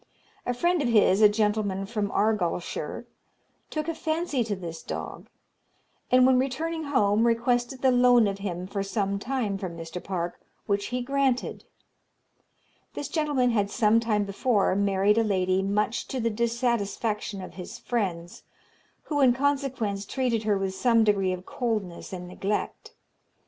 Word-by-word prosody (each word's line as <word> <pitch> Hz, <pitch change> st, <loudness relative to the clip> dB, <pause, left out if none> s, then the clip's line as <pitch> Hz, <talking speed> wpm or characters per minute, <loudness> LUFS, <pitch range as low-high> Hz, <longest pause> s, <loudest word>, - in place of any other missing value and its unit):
A 245 Hz, -, +1 dB
friend 345 Hz, +5 st, +1 dB
of 275 Hz, -, 0 dB
his, 210 Hz, -3 st, +4 dB
a 210 Hz, -, +8 dB
gentleman 210 Hz, -2 st, 0 dB
from 205 Hz, -1 st, -2 dB
Argyllshire, 200 Hz, -5 st, -1 dB, 0.6 s
took 310 Hz, 0 st, -3 dB
a 330 Hz, -, -1 dB
fancy 315 Hz, -5 st, -1 dB
to 215 Hz, -2 st, -2 dB
this 170 Hz, -3 st, -7 dB
dog; -, -, -6 dB, 0.8 s
and, 255 Hz, 0 st, +6 dB
when 260 Hz, -1 st, +5 dB
returning 315 Hz, +5 st, -2 dB
home, 225 Hz, -5 st, +2 dB
requested 245 Hz, +2 st, 0 dB
the 260 Hz, -, +5 dB
loan 245 Hz, -2 st, +5 dB
of 200 Hz, -1 st, -2 dB
him 180 Hz, -3 st, -4 dB
for 195 Hz, +1 st, -3 dB
some 200 Hz, 0 st, -1 dB
time 220 Hz, -4 st, -2 dB
from 180 Hz, -3 st, -5 dB
Mr. 165 Hz, +2 st, -7 dB
Park, 175 Hz, -2 st, -3 dB, 0.3 s
which 200 Hz, 0 st, 0 dB
he 250 Hz, 0 st, -2 dB
granted. 270 Hz, -1 st, 0 dB, 1.3 s
This 285 Hz, -, -4 dB
gentleman 290 Hz, -6 st, +1 dB
had 205 Hz, -3 st, +1 dB
some 220 Hz, 0 st, +3 dB
time 215 Hz, -3 st, +1 dB
before 200 Hz, 0 st, +1 dB
married 200 Hz, +2 st, +2 dB
a -, -, +3 dB
lady 185 Hz, -3 st, +1 dB
much 210 Hz, +4 st, -1 dB
to 260 Hz, -, -3 dB
the 230 Hz, -1 st, 0 dB
dissatisfaction 230 Hz, -2 st, -1 dB
of 185 Hz, -, -8 dB
his 185 Hz, +5 st, -8 dB
friends, 185 Hz, -8 st, -3 dB, 0.6 s
who, 290 Hz, -2 st, -1 dB
in 255 Hz, -2 st, +6 dB
consequence, 260 Hz, -7 st, -1 dB
treated 240 Hz, -5 st, -1 dB
her 210 Hz, -2 st, +2 dB
with 195 Hz, -1 st, -2 dB
some 230 Hz, +3 st, +3 dB
degree 200 Hz, -3 st, +2 dB
of 185 Hz, 0 st, -5 dB
coldness 215 Hz, -8 st, -3 dB
and 180 Hz, -1 st, -6 dB
neglect. 195 Hz, +3 st, -4 dB
215 Hz, 155 wpm, -26 LUFS, 195-250 Hz, 1.3 s, a